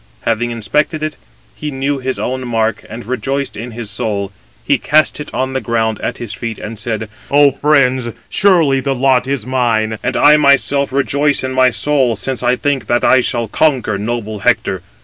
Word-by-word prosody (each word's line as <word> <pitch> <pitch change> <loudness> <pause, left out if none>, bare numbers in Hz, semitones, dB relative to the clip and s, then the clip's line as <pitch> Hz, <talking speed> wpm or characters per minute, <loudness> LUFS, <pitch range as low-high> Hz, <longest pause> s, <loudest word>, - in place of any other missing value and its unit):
Having 115 +1 0
inspected 150 +8 -1
it, 155 -1 -3 0.4
he 150 - -5
knew 135 0 -2
his 130 0 -3
own 130 0 -3
mark, 115 -1 -1
and 115 +2 -8
rejoiced 135 +3 -3
in 115 +3 -6
his 115 -2 -6
soul. 100 -2 -2 0.3
He - - +2
cast 155 +1 +2
it 150 - -7
on 130 +1 -2
the 130 - -1
ground 110 -1 -1
at - - -3
his 115 -3 -5
feet, 115 -2 -5
and 110 0 -7
said: 110 0 -3 0.2
"Ο 145 0 +5
friends, 130 -3 +2 0.2
surely 165 -9 +3
the 135 0 -1
lot 130 0 +2
is 135 -5 -2
mine, 115 -4 0
and - - -1
I 150 +1 +6
myself 140 -1 +3
rejoice 140 +1 +1
in 130 - -2
my 130 0 +4
soul, 125 +1 +1
since 130 +5 -3
I 125 0 +2
think 135 -4 -1
that 120 - +1
I 130 - +5
shall 120 -2 -1
conquer 125 -5 +1
noble 110 -1 -3
Hector. - - 0
130 Hz, 190 wpm, -16 LUFS, 115-140 Hz, 0.4 s, I